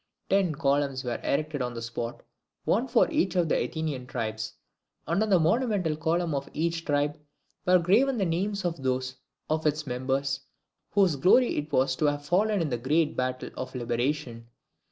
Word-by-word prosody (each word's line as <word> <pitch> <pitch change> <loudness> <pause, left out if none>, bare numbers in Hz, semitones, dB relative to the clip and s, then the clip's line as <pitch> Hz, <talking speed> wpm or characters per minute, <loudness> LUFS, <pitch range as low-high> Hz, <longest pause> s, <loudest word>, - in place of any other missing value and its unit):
Ten 190 -5 +3
columns 140 -2 +1
were 120 -2 -3
erected 150 0 -1
on 125 -1 -3
the 115 - -5
spot, 115 0 -5 0.4
one 235 +6 +2
for 240 -2 +4
each 185 0 +1
of 175 -2 +3
the - - +2
Athenian 150 -6 -4
tribes; 110 -3 -3 0.5
and 170 +5 +1
on 220 - +1
the 190 -3 +5
monumental 185 -2 +1
column 165 +1 0
of 140 0 -3
each 165 +1 -1
tribe 145 +1 0 0.5
were 180 0 +7
graven 225 +10 +3
the 195 - +1
names 195 +4 -1
of 170 -4 -2
those 130 0 -1 0.3
of 155 0 0
its 150 0 0
members 135 +2 -1 0.5
whose 190 -7 +3
glory 215 - +4
it 150 +1 -3
was 130 -1 +2
to 155 - +1
have 145 0 0
fallen 200 +4 +2
in 155 - -2
the 120 - -1
great 150 +5 +1
battle 130 0 -2
of 130 +1 -6
liberation. 120 -1 -2
150 Hz, 175 wpm, -27 LUFS, 130-175 Hz, 0.5 s, were